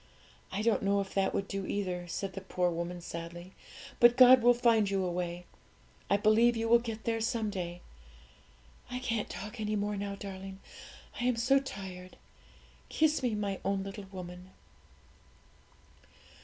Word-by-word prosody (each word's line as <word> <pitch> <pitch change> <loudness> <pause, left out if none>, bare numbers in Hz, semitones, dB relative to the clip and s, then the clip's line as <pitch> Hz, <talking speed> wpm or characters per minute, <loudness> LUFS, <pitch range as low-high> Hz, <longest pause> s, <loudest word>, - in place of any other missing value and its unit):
I 200 +3 -2
don't 230 -1 +2
know 200 0 +2
if 195 -1 -4
that 195 -1 +1
would 195 - -2
do 195 -1 -4
either,' 180 -3 -3
said 190 +3 -4
the 195 - -6
poor 180 -2 0
woman 170 +1 -4
sadly; 170 +2 -7 0.5
'but 240 +1 +6
God 255 0 +9
will 245 +1 +6
find 230 -4 +3
you 195 -1 0
a 180 - -1
way. 175 0 -4 0.6
I 200 - +4
believe 225 +3 +4
you 225 0 -1
will 235 +1 +6
get 225 -2 -6
there 225 -1 -1
someday. 200 -6 -2 1.1
I 250 - -4
can't 230 -4 -2
talk 210 +3 -7
any 215 0 -1
more 205 0 -1
now, 200 0 -4
darling, 195 -1 -8 0.6
I 240 - -1
am 250 -1 +2
so 255 +4 +3
tired! 190 -8 -8 0.7
Kiss 310 -1 +2
me, 245 -4 0
my 200 -2 -2
own 195 0 0
little 195 +1 -7
woman.' 180 -1 -8
200 Hz, 160 wpm, -31 LUFS, 185-230 Hz, 1.1 s, God